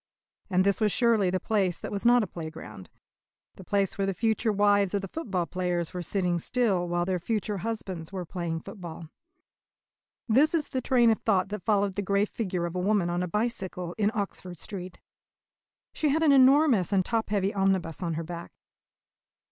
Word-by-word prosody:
And 185 -1 +3
this 200 +2 +1
was 210 -1 +3
surely 225 -5 +3
the 185 +1 0
place 190 -5 0
that - - -6
was 205 +3 0
not 245 -1 +5
a - - -1
playground, 160 - -9 0.6
the 190 - -12
place 200 +1 0
where 195 - +1
the 195 - -1
future 220 +1 +1
wives 205 -1 +3
of 200 - -1
the - - -4
football 190 - -3
players 175 -1 -2
were 180 - -3
sitting 175 0 0
still 195 -4 0
while 175 0 0
their 185 -1 -1
future 210 +2 -2
husbands 190 -6 -4
were 185 -2 -4
playing 170 -2 -4
football. 170 -5 -9 1.2
This 280 +9 +4
is 305 -3 0
the 260 - -2
train 240 -2 +4
of 220 - 0
thought 195 -3 +1
that 210 -2 -6
followed 200 -2 +2
the 205 - -2
grey 200 +1 +1
figure 185 -6 -3
of 170 +1 -5
a - - -1
woman 190 -2 +1
on 175 +1 -1
a 180 - -1
bicycle 190 -4 -3
in 205 -1 +3
Oxford 185 -4 -4
Street. 185 +1 -7 0.9
She 305 - 0
had 315 +3 +2
an 305 - +5
enormous 265 - +5
and 190 -2 +2
top 225 -2 -1
heavy 200 -1 0
omnibus 190 -5 0
at 170 -3 -2
her 165 - -3
back. 170 +1 -8
195 Hz, 190 wpm, -27 LUFS, 175-220 Hz, 1.2 s, not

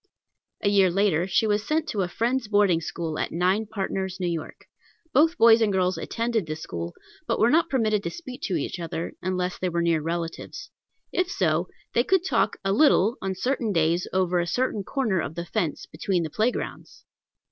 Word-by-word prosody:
A 200 - +3
year 195 -2 +5
later, 185 -2 +2
she 195 +4 +2
was 210 -1 +1
sent 310 +5 0
to 205 - -1
a 180 - 0
Friends' 235 +6 -1
boarding 205 -5 +3
school 160 -1 -4
at - - -2
Nine 185 +6 +1
Partners, 190 -2 -3
N.Y. 170 -3 -2 0.6
Both 320 +6 +4
boys 230 0 +7
and 215 -2 +3
girls 185 -1 +1
attended 230 -5 -2
this 155 +1 -5
school, 85 0 -5 0.3
but - - +1
were 230 +2 +4
not 330 +2 +3
permitted 215 -6 +1
to - - -3
speak 265 -8 -9
to 185 - -1
each 165 +3 -3
other 165 0 -4
unless 180 0 -2
they 185 - 0
were 170 0 0
near 165 -2 +2
relatives; 165 +1 -5 0.4
if 365 0 0
so, 170 - +1 0.3
they 240 - +3
could 370 +4 +2
talk - - +1
a 195 - +2
little 235 - +4
on 190 0 -2
certain 235 +2 -1
days 165 0 +1
over 185 -1 +1
a 175 - -1
certain 220 0 -1
corner 215 -6 0
of 155 - -5
the 170 0 -4
fence, 175 -5 -2
between 180 -4 -1
the 160 - -5
playgrounds! 220 +7 -3
190 Hz, 190 wpm, -25 LUFS, 170-225 Hz, 0.6 s, boys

